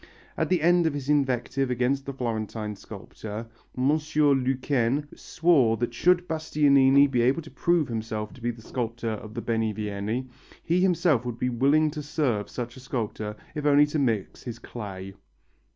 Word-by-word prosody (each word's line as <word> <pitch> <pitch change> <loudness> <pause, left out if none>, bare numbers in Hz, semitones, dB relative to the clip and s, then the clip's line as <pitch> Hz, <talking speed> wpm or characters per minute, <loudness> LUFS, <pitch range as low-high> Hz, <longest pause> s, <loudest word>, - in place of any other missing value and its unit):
At - - -1
the 180 -4 +2
end 175 0 +4
of 150 - -1
his 140 -1 -5
invective 135 -2 +1
against 125 +3 0
the 140 - -3
Florentine 110 -4 -3
sculptor, 110 +2 -8 0.3
M. 130 +2 +2
Lequesne 140 -2 +1
swore 140 -10 +2
that 120 0 -2
should 175 +7 +3
Bastianini 140 -3 +4
be 130 -4 +1
able 130 +7 +2
to 155 - -13
prove 170 -4 +1
himself 110 -2 -4
to 130 - -15
be 120 - -1
the 115 -2 -7
sculptor 115 -2 -3
of 110 +1 -7
the 120 - -4
Benivieni, 110 +1 -2 0.4
he 175 +2 +1
himself 170 -8 +3
would 120 -2 -5
be 125 - 0
willing 140 +6 +3
to 150 0 -5
serve 140 -8 -1
such 120 -1 -5
a - - -9
sculptor, 110 -4 -4 0.2
if 150 - -4
only 145 0 +5
to 150 +1 -2
mix 115 -8 -1
his 120 -2 -6
clay. 95 -5 -8
130 Hz, 170 wpm, -26 LUFS, 115-150 Hz, 0.4 s, only